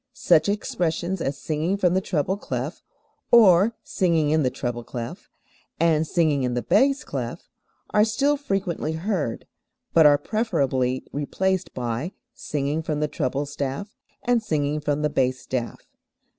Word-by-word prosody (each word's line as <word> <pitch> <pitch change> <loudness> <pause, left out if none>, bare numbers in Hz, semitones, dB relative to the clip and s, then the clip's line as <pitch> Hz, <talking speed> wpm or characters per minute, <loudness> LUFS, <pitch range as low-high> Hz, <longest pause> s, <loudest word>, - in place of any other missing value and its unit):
Such 190 - +3
expressions 175 -3 -1
as 135 -2 -2
"singing 155 +6 -1
from 180 -3 +2
the 190 - +2
treble 185 0 0
clef," 200 - -4 0.5
or 210 -1 +6
"singing 165 -5 +1
in 155 0 +3
the 130 - +2
treble 120 -1 -4
clef," 115 -1 -7 0.5
and 160 -1 +3
"singing 155 -5 +2
in 125 -1 -1
the 125 - -1
bass 275 +1 +3
clef" - - -5 0.4
are 210 - +5
still 275 +7 +2
frequently 195 - -2
heard, 160 - -2 0.5
but 160 -2 +7
are 145 -1 +6
preferably 135 - 0
replaced 185 +6 -1
by 125 - -3 0.2
"singing 145 +2 -2
from 155 -2 -2
the 150 - +1
treble 140 0 -2
staff," 140 +7 -4 0.3
and 245 -1 +2
"singing 150 -7 -1
from 150 0 -1
the 150 - +2
bass 130 -2 +1
staff." 120 -3 -4
155 Hz, 145 wpm, -24 LUFS, 140-190 Hz, 0.5 s, but